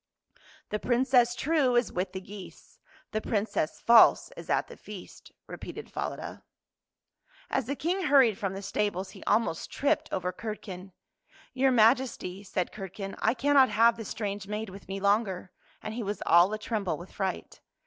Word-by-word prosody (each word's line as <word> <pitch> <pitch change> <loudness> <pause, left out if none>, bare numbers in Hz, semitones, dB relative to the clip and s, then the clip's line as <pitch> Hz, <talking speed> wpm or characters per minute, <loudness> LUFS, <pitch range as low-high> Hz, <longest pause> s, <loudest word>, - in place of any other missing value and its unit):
" - - -26
The 210 - -1
Princess 245 0 +3
true 275 -3 +2
is 240 -2 +2
with 180 +1 -2
the 190 - -4
geese. 195 0 -12 0.3
The 215 - -1
Princess 205 -8 -1
false 235 - +6
is - - -10
at - - +1
the - - -11
feast." - - -11
repeated - - -8
Falada. - - -5 1.1
As - - 0
the 280 - -2
King 360 +7 -1
hurried 265 -7 +5
from 195 -3 -2
the 195 - -6
stables 195 -2 -2
he - - -12
almost 220 -7 +1
tripped 280 - 0
over 180 0 -2
Curdken. 195 -3 -7 0.3
" - - -28
Your 265 +1 +3
Maj 235 +2 +6
esty," 195 -7 -6
said 185 -2 -2
Curdken, 195 0 -7
'' - - -14
I 220 +3 +2
cannot 270 +1 +4
have 230 +1 +4
this 225 -2 -7
strange 200 -2 -4
maid 210 0 -4
with 195 +1 -12
me 195 +1 -4
longer," 200 -2 0 0.3
and 215 - -5
he 235 - -4
was 205 -1 -3
all 175 +3 +6
a 215 - -2
tremble 210 -7 -2
with 175 +4 -11
fright. 190 -1 -4
210 Hz, 180 wpm, -28 LUFS, 190-240 Hz, 1.1 s, false